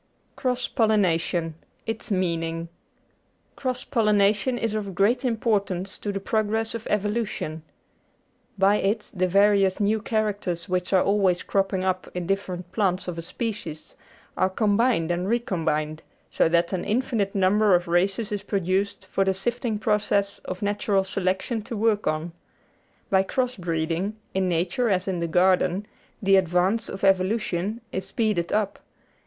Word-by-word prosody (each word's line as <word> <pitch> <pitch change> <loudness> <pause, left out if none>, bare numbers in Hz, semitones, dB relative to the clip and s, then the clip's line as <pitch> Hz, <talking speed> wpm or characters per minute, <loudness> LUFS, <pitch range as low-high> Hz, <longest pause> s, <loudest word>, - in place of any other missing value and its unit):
Cross 250 -2 -1
Pollination: 175 -6 +1 0.3
its 225 0 -4
Meaning 165 -3 -1 0.9
Cross 255 -2 -2
pollination 210 +2 +2
is 225 -2 -1
of 200 -4 -3
great 235 +8 +2
importance 205 -6 -1
to 205 - -3
the 195 - -3
progress 220 +2 -1
of 230 -1 -6
evolution. 210 -6 -1 1.0
By 195 +2 +4
it 210 +2 -1
the 185 -1 +1
various 195 0 +4
new 210 +1 +1
characters 205 -6 -1
which 180 -1 -1
are 190 -2 +4
always 195 -3 +2
cropping 195 -1 0
up 185 -1 -1
in 180 -1 -2
different 180 -2 -3
plants 185 -2 0
of 170 -2 -4
a - - -3
species 175 -4 -5 0.4
are 185 +1 +2
combined 205 -3 +2
and 175 +2 -1
recombined, 160 -9 -1 0.3
so - - +3
that 170 +2 +2
an 180 - -1
infinite 215 -3 0
number 200 +1 +4
of 175 0 0
races 190 +5 +1
is 205 -1 -2
produced 195 0 -1
for 195 - 0
the 190 0 +1
sifting 235 +2 -2
process 205 -2 0
of 185 +2 -5
natural 205 -1 +1
selection 190 +4 -1
to 230 +1 -6
work 215 -1 +1
on. 155 +2 -1 0.8
By 190 -1 +5
cross 250 +5 -1
breeding, 170 +3 -2 0.2
in 190 -1 +1
nature 185 +9 0
as 185 -1 +1
in 185 -2 -1
the 170 - -1
garden, 185 +2 +2 0.4
the 195 0 +5
advance 185 +5 +1
of 195 - -7
evolution 195 +2 +1
is 190 - -4
speeded 215 -8 0
up. 210 -1 0
195 Hz, 145 wpm, -25 LUFS, 180-215 Hz, 1.0 s, By